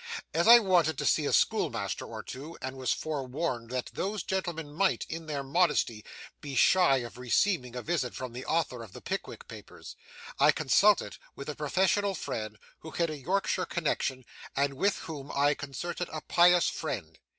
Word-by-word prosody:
As 170 +4 +2
I 235 +1 +11
wanted 175 - +2
to - - -2
see - - +2
a - - 0
schoolmaster - - +1
or - - -7
two, 145 +6 -8
and 130 0 -5
was 130 -1 -1
forewarned 135 -4 -3
that 125 0 -3
those 200 -1 -2
gentlemen 170 -6 -3
might, 190 +4 +1
in 165 0 -6
their 145 -2 -3
modesty, 140 - +1 0.4
be 140 -2 -6
shy 175 0 +5
of 120 - -10
receiving 125 - +1
a 125 - -5
visit 155 -7 -1
from 130 -2 -6
the 125 +2 -6
author 155 -7 0
of 110 -5 -11
the - - -10
"Pickwick - - -5
Papers," - - -11 0.4
I 145 +2 +6
consulted 165 - +3 0.2
with 140 - -7
a 150 - -4
professional 190 +6 +1
friend 110 -8 -5 0.2
who 160 - -9
had 165 0 -1
a 155 - -5
Yorkshire 185 +5 -1
connexion, 135 -6 -2 0.3
and 140 0 +1
with 195 +9 +1
whom 145 -4 -7
I 145 +1 +4
concerted 160 +5 -5
a 155 - -5
pious 175 +2 +5
fraud. 100 - -4
150 Hz, 175 wpm, -29 LUFS, 130-175 Hz, 0.4 s, I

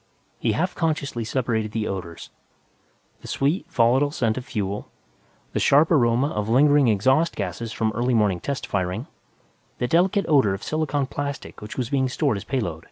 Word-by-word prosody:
He - - +1
half 180 +3 -1
consciously 145 -7 -1
separated 110 -3 -1
the 110 -1 -1
odors; 90 -4 -6 0.9
the - - -10
sweet, 155 +5 -1
volatile 130 0 +3
scent 115 -6 0
of 130 - -5
fuel, 100 -4 -4 0.6
the - - 0
sharp 150 +4 +4
aroma 125 -2 +3
of 105 0 -2
lingering 145 +2 +5
exhaust 130 +10 +2
gases 105 +4 -4
from 110 0 -1
early 120 +2 +1
morning 105 -5 +2
test 140 +6 -4
firing, 95 +5 -2 0.7
the 125 - -1
delicate 180 +6 +2
odor 135 - +4
of 95 - -10
silicon 155 -3 -1
plastic 140 +1 -6
which 105 - -8
was 125 -3 -2
being 130 -2 +1
stowed 135 -4 0
as 100 - -6
payload. 100 - -2
125 Hz, 165 wpm, -24 LUFS, 105-145 Hz, 0.9 s, lingering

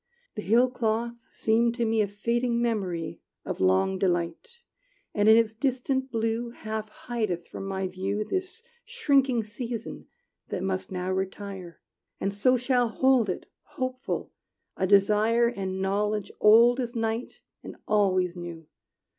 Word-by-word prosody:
The 210 - -5
hill 235 +5 +4
cloth 235 -1 -2
seem 230 +1 +2
to 235 -1 -1
me 225 0 +2
A 205 - +1
fading 235 +4 -1
memory 190 -9 -2 0.2
Of - - -4
long 95 - +2
delight, 175 -3 0 0.7
And 205 +1 +3
in 220 - +8
its 225 -1 +2
distant 260 +2 -1
blue 230 +1 -1
Half 220 -2 -5 0.2
hideth 215 -8 -2
from 195 - -7
my 190 -1 -2
view 190 +3 -2
This 375 - -4 0.2
shrinking 275 - +2
season 230 +2 -6 0.4
that 185 - -3
must 190 0 -2
now 185 0 -2
retire; 190 -2 -5 0.4
And 195 - -1
so 250 +6 +3
shall 245 -1 +1
hold 255 -2 +3
it, 180 - -3 0.3
hopeful, 255 +1 -3 0.4
a 190 - 0
desire 210 +4 +4
And 190 -4 -3
knowledge 205 +1 -1
old 235 +4 +6
as 245 -1 -3
night 225 +1 -2 0.2
and - - -9
always 185 -4 +2
new. 170 -2 -8
220 Hz, 140 wpm, -27 LUFS, 190-240 Hz, 0.7 s, in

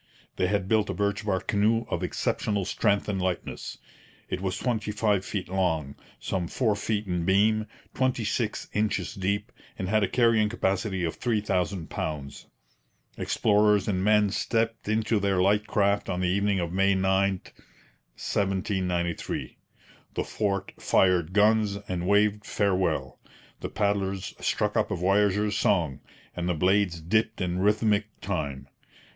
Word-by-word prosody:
They 90 - +2
had 100 -1 0
built 110 -1 +2
a - - -2
birch 100 +1 -1
bark 95 -3 -1
canoe 110 +3 +2
of - - -2
exceptional 100 -3 -1
strength 100 +1 +1
and 100 -3 -1
lightness. 90 -1 -3 0.5
It 90 - -3
was 95 -1 -2
twenty 110 -4 -1
five 105 -2 +1
feet 95 -3 -4
long, 80 -7 0 0.3
some 90 -3 -2
four 110 0 +1
feet 105 +1 -2
in 90 -3 -1
beam, 105 +4 +3 0.3
twenty 130 -3 0
six 110 +1 -2
inches 105 0 0
deep, 100 0 -2 0.3
and 95 - -3
had 110 +1 +3
a 100 - +2
carrying 115 -3 +3
capacity 95 -3 -1
of 80 - -2
three 115 -3 0
thousand 90 -4 -2
pounds. 70 -3 -5 0.7
Explorers 105 -1 +2
and 95 -3 0
men 105 -1 +4
stepped 115 +1 -1
into 110 0 +1
their 100 -2 +1
light 105 +3 +2
craft 100 0 +1
on 90 0 -1
the 90 - +1
evening 100 +1 +1
of 85 -1 -3
May 95 +1 +3
9, 95 +1 +2
1793. 95 -3 -3 0.6
The - - 0
fort 100 -2 -2
fired 90 -3 +3
guns 105 0 +3
and 90 -1 -3
waved 105 +1 +3
farewell; 90 -12 0 0.4
the - - -5
paddlers 100 -2 -1
struck - - 0
up - - +1
a - - -1
voyageurs' 105 +3 +2
song; 80 -9 +1 0.4
and 90 0 -2
the 90 - +1
blades 95 +1 +2
dipped 110 +8 0
in 90 -1 -1
rhythmic 105 +1 +2
time. 70 -9 -3
100 Hz, 150 wpm, -27 LUFS, 90-105 Hz, 0.7 s, men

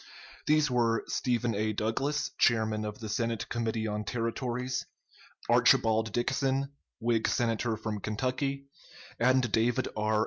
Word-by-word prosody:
These 150 -2 +3
were 115 -2 +2
Stephen 120 -2 0
A. 110 +1 0
Douglas, 135 +7 -1
chairman 110 -2 +2
of 105 +3 -6
the 110 - -5
Senate 115 +1 -2
Committee 115 -1 -1
on 105 0 -2
Territories; 125 +3 -2 0.6
Archibald 110 -1 +4
Dixon, 135 +3 0 0.3
Whig 115 -1 +1
Senator 115 -2 0
from 110 -1 -4
Kentucky; 130 +6 -2 0.5
and 125 -1 +3
David 115 +3 +1
R. 110 0 +1
115 Hz, 125 wpm, -30 LUFS, 110-130 Hz, 0.6 s, Archibald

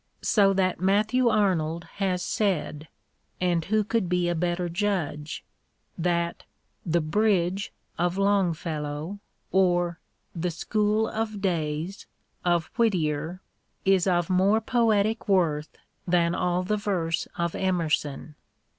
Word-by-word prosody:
So 200 -2 +4
that 185 -2 0
Matthew 215 +6 +3
Arnold 170 -6 +1
has 185 -3 0
said 170 -7 -1 0.3
— - - -44
and 175 -2 +1
who 215 +1 +2
could 210 -3 -1
be 180 -1 +1
a - - +1
better 175 +1 -1
judge? 170 -5 -2 0.3
— - - -46
that 170 0 -1 0.2
" - - -45
The 170 - +4
Bridge 190 +2 +1
" - - -24
of 175 +1 +1
Longfellow 170 -3 -1 0.3
or 175 -2 +2 0.3
"The 175 +1 -2
School 215 +5 0
of 215 -2 -3
Days" 165 -1 -2 0.4
of 175 -2 +1
^^ittier 170 -5 0 0.4
is 190 -1 +4
of 175 -2 +2
more 195 +4 +3
poetic 220 -2 +1
worth 160 -6 +1 0.3
than 170 -1 +3
all 180 0 0
the 210 +3 0
verse 180 -6 -1
of 170 -1 -1
Emerson. 160 -5 -1
180 Hz, 130 wpm, -26 LUFS, 170-200 Hz, 0.4 s, So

